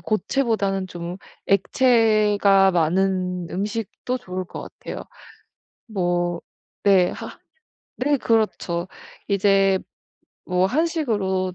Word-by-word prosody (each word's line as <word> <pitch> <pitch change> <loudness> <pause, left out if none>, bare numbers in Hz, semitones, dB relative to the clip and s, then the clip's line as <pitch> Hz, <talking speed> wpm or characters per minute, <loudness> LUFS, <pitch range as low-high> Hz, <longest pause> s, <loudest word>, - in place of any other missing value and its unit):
고체보다는 215 -3 0
좀 175 0 -6 0.3
액체가 210 -2 +4
많은 180 +1 0
음식도 215 +5 -3
좋을 185 -4 -5
것 - - -8
같아요. - - -8 0.8
뭐 175 -5 -1 0.4
네. 190 -3 +5
하 - - -8 0.6
네 290 +2 +3
그렇죠. 210 -7 0 0.4
이제 195 -1 +3 0.7
뭐 180 0 +2
한식으로 215 - 0
195 Hz, 175 characters per minute, -23 LUFS, 180-220 Hz, 0.8 s, 네